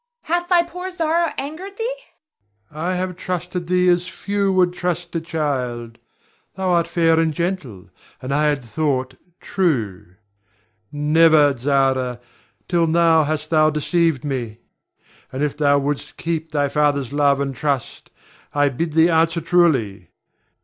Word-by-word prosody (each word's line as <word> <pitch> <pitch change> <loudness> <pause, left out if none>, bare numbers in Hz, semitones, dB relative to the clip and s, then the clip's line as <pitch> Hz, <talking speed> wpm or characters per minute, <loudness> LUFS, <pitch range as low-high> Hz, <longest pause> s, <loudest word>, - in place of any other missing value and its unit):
Hath 345 +2 -1
thy 350 -2 +5
poor 360 +2 -7
Zara 335 -2 0
angered 345 +8 -6
thee? 475 +2 -2 0.8
Ber. 150 - -15
I 180 +3 -1
have 180 0 -3
trusted 180 -1 -4
thee 180 0 +2
as 175 0 +2
few 200 -1 -1
would 180 -1 +2
trust 175 -1 -3
a 165 - 0
child. 130 -8 -3 0.6
Thou 190 0 -2
art 170 -1 +2
fair 165 -1 +2
and 165 -1 +2
gentle, 160 - -4 0.3
and 130 +2 -4
I 150 +2 +2
had 145 -3 0
thought 130 0 -2 0.3
true. 110 - -2 0.8
Never, 150 -1 +4
Zara, 130 -1 0 0.5
till 170 -2 +2
now 165 -1 +4
hast 155 +1 -3
thou 155 -1 +4
deceived 155 -1 0
me; 120 -6 -4 0.7
and 130 +3 -3
if 150 - -1
thou 145 -1 +3
wouldst 140 0 -3
keep 165 -1 -3
thy 145 -1 +1
father's 140 -2 0
love 145 -1 +3
and 140 -1 -2
trust, 140 -1 -3 0.5
I 145 0 +3
bid 155 +4 -3
thee 160 +1 +5
answer 165 +1 +2
truly. 135 - +1
160 Hz, 145 wpm, -21 LUFS, 140-180 Hz, 0.8 s, thy